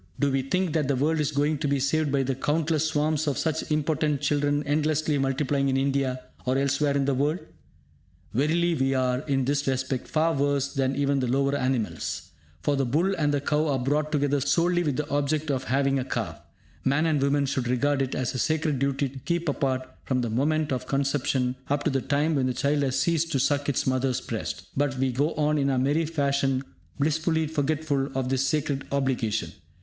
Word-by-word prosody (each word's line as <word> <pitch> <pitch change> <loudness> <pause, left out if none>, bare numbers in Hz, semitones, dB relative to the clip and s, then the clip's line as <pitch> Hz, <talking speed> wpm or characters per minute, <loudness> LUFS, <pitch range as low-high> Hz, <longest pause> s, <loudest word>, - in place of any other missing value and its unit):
Do 140 -1 +2
we 135 0 +1
think 180 +5 -1
that 150 -4 +1
the 140 - +1
world 155 +5 +1
is 150 -1 0
going 145 +1 +1
to 150 - -1
be 140 0 +1
saved 145 +2 +1
by 135 -1 +2
the 135 +1 -1
countless 155 +3 0
swarms 155 0 0
of 140 - 0
such 160 -1 -1
impotent 150 -1 +1
children 145 0 +1
endlessly 150 0 +1
multiplying 135 +1 +1
in 135 - +1
India 135 -1 0 0.2
or 130 +1 +1
elsewhere 140 +1 +1
in 140 - +1
the 140 - +1
world? 145 +5 +1 1.0
Verily 165 +7 +2
we 135 -3 +1
are, 125 -1 +1
in 135 -2 +1
this 140 +1 0
respect, 130 -1 -1
far 160 +1 +1
worse 140 -1 0
than 135 0 0
even 140 0 +1
the 130 - 0
lower 135 +3 +1
animals; 125 - -2 0.3
for, 145 - +2
the 135 - +1
bull 160 +10 +1
and 150 -2 +1
the 145 -1 0
cow 150 +2 +1
are 140 -2 +1
brought 145 +4 0
together 145 -2 +1
solely 175 +5 +2
with 150 -6 0
the 150 +1 -2
object 145 +1 0
of 130 -1 -2
having 135 +1 +1
a - - -1
calf. 130 - -4 0.4
Man 140 +4 +2
and 155 -4 +1
woman 140 +1 +2
should 130 -3 -1
regard 135 +3 +1
it 135 -1 -1
as 130 -1 -1
sacred 155 -3 0
duty 140 +1 0
to 135 +1 -9
keep 170 +4 -2
apart 130 -2 -1 0.2
from 130 -2 0
the 120 -2 -2
moment 150 +5 +1
of 130 - -2
conception 135 -2 0
up 145 0 0
to 155 - +1
the 135 -1 0
time 150 +4 +1
when 135 -3 +1
the 125 - -1
child 145 +3 +1
has 135 -2 0
ceased 165 -2 +1
to 135 - +2
suck 145 +2 +1
its 140 - 0
mother's 130 -1 +1
breast. - - -5
But 140 -1 0
we 130 0 +1
go 145 +6 0
on 150 0 +1
in 140 0 +1
our 135 - +1
merry 145 +5 +1
fashion 140 -4 0 0.3
blissfully 160 +2 +1
forgetful 150 -2 -1
of 130 -1 -1
this 135 0 +1
sacred 145 -1 -1
obligation. 130 -6 0
140 Hz, 205 wpm, -26 LUFS, 135-150 Hz, 1.0 s, Do